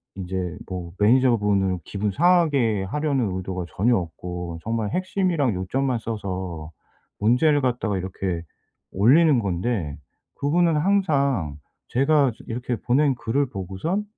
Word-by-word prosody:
이제 90 -2 -4
뭐 90 -2 -6
매니저분을 105 -5 +3
기분 100 +1 -2
상하게 145 - +3
하려는 135 -3 -1
의도가 90 -1 -4
전혀 115 +8 +2
없고 90 -1 -5
정말 110 -2 -1
핵심이랑 180 - 0
요점만 125 +7 -1
써서 95 -7 -5 0.5
문제를 140 +8 +3
갖다가 120 -6 0
이렇게 90 -2 -3 0.5
올리는 135 - +5
건데 95 -5 -2 0.4
그분은 165 +3 +2
항상 140 - +1 0.3
제가 140 0 +3
즈 - - -14
이렇게 120 +1 -3
보낸 135 +4 +2
글을 125 +4 0
보고선 100 - -3
115 Hz, 280 characters per minute, -24 LUFS, 95-140 Hz, 0.5 s, 올리는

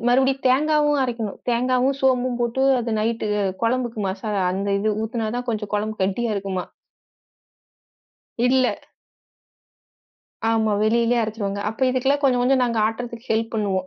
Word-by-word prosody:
மறுபடியும் 265 +2 +2
தேங்காவும் 295 +2 +3
அரைக்கணும். 230 -5 -3
தேங்காவும், 255 +3 +1
சோம்பும் 255 -2 +1
போட்டு 240 +2 0 0.2
அது 235 - -3
நைட்டு 225 0 -1 0.4
குழம்புக்கு 235 -1 0
மசாலா 205 0 -2
அந்த 195 +2 -2
இது 215 +2 0
ஊத்துனா 220 0 -2
தா - - -1
கொஞ்சம் 215 -2 -4
கொழம்பு 215 +1 -2
கெட்டியா 215 +4 0
இருக்குமாம். 195 -2 -4 1.8
இல்ல. 260 +1 +3 1.8
ஆமா, 220 -1 +2
வெளிலயே 235 +2 +2
அரச்சுருவாங்க. 205 -2 -3
அப்ப 220 - -8
இதுக்கெல்லாம் 265 +3 +1
கொஞ்சம், 250 -3 +3
கொஞ்சம் 260 +1 +3
நாங்க 235 -2 -1
ஆட்டறதுக்கு 235 +1 -6
ஹெல்ப் 225 +1 0
பண்ணுவோம். 190 -3 -1
235 Hz, 130 wpm, -22 LUFS, 215-255 Hz, 1.8 s, தேங்காவும்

